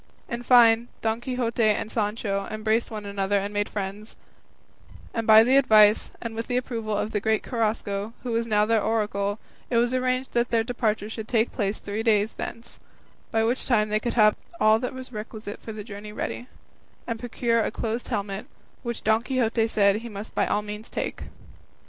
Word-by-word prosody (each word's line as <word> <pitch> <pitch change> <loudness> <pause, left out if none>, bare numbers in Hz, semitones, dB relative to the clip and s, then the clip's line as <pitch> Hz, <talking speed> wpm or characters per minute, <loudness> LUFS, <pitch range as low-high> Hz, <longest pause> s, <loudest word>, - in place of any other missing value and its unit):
In 235 0 -4
fine, 235 -1 +6 0.2
Don 225 +1 0
Quixote 245 -2 -2
and 215 0 +2
Sancho 205 -2 -1
embraced 220 +1 0
one 215 -2 -6
another 200 0 0
and 200 +1 -3
made 205 0 -1
friends, 205 +1 -5 1.0
and 230 -1 -2
by 220 0 +9
the 260 +4 +4
advice 215 -5 +5
and 230 -1 -5
with 225 +1 -4
the 245 - 0
approval 225 -4 -2
of 210 - -2
the 210 - 0
great 220 +1 +1
Carrasco, 215 -3 -2
who 245 - -3
was 230 0 0
now 210 -1 +3
their 225 0 +2
oracle, 205 -2 0 0.3
it 235 - +1
was 240 +1 +2
arranged 255 0 0
that 240 0 +1
their 230 -1 +2
departure 220 -3 -1
should 220 0 -6
take 230 -1 +1
place 205 -2 -1
three 205 +2 -4
days 220 -1 +2
thence, 230 +1 -7 0.5
by 225 0 +1
which 240 +3 0
time 215 -4 +3
they 215 0 +1
could 240 +2 -2
have 215 -2 +5 0.2
all 215 +1 +5
that 250 +2 -4
was 260 0 -8
requisite 215 -1 -7
for 225 - -7
the 215 -1 -7
journey 210 -1 -8
ready, 240 +3 -4 0.6
and 230 -2 -3
procure 230 -1 0
a - - 0
closed 230 +1 -3
helmet, 200 -1 -3 0.3
which 235 -2 -5
Don 220 +1 +3
Quixote 235 -3 +1
said 200 -2 +3
he 235 +2 -7
must 205 0 -7
by - - +1
all 210 - 0
means 210 +1 -7
take. - - -4
220 Hz, 190 wpm, -25 LUFS, 210-235 Hz, 1.0 s, by